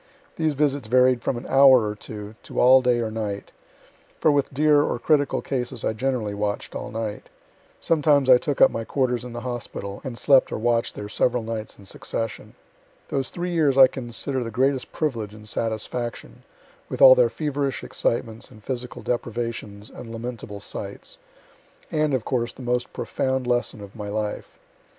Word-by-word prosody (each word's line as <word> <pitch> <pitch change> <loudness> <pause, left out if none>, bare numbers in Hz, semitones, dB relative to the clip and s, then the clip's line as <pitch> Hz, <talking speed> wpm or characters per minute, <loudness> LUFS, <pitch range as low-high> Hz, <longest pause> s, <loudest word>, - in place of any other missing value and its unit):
These 155 -2 0
visits 140 -4 0
varied 125 +1 +4
from 120 - -1
an 120 - -7
hour 135 -4 +6
or 105 - -2
two, 105 0 -9
to - - -5
all 130 +1 +7
day 125 -2 +2
or 110 -1 -2
night; 105 -2 -4 0.7
for 155 - +4
with 145 -1 +1
dear 145 +1 +4
or 145 - 0
critical 145 +2 +1
cases 125 -3 -3
I - - +1
generally 115 -3 -1
watch'd 100 0 -3
all - - -5
night. 110 -2 -5 0.5
Sometimes 145 -4 +3
I 125 -1 +8
took 145 0 -2
up - - +7
my 115 - -3
quarters 125 -1 -1
in 125 -1 -8
the 120 - -5
hospital, 120 -5 -6
and 125 -3 -6
slept 135 0 +4
or - - -2
watch'd 115 +1 0
there 105 - -6
several 125 +3 +1
nights 110 -1 -5
in 100 - -15
succession. 115 +3 -5 0.5
Those 135 -1 -1
three 180 +1 -4
years 150 -6 +2
I 135 - +10
consider 130 +1 -3
the 115 - -5
greatest 130 +3 0
privilege 115 -9 -3
and 110 0 -12
satisfaction, 115 +2 -4 0.5
(with - - -5
all - - +10
their - - +4
feverish 145 -3 -2
excitements 115 -1 -2
and 105 - -16
physical 125 -1 -5
deprivations 115 -3 -4
and 115 - -10
lamentable 115 -3 -6
sights,) - - -7 0.7
and, 155 -3 +1
of 125 - -3
course, 120 -2 -1
the 130 - -11
most 125 0 -1
profound 130 -1 -2
lesson 120 -3 -1
of 100 -1 -11
my 105 -2 -6
life. 105 0 -4
125 Hz, 175 wpm, -24 LUFS, 110-135 Hz, 0.7 s, I